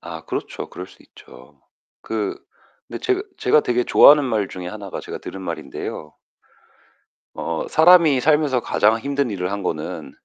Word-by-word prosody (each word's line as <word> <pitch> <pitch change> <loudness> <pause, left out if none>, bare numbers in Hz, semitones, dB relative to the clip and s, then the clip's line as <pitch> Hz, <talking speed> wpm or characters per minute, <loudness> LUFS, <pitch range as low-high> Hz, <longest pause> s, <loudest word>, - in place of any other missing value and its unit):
아 - - -9
그렇죠. - - -5
그럴 90 - -8
수 - - -19
있죠. 70 +3 -18 0.4
그 105 -3 -3 0.5
근데 - - -6
제그 390 +1 -1
제가 150 - +3
되게 125 -3 0
좋아하는 145 0 +7
말 110 -6 -1
중에 90 -1 -8
하나가 100 0 -7
제가 - - -8
들은 95 - -9
말인데요. 75 -4 -6 1.2
어 80 -1 -4
사람이 160 -4 +5
살면서 150 -2 +2
가장 110 -1 +2
힘든 140 +1 -2
일을 90 -2 -3
한 100 0 -4
거는 80 -4 -5
110 Hz, 305 characters per minute, -21 LUFS, 95-145 Hz, 1.2 s, 좋아하는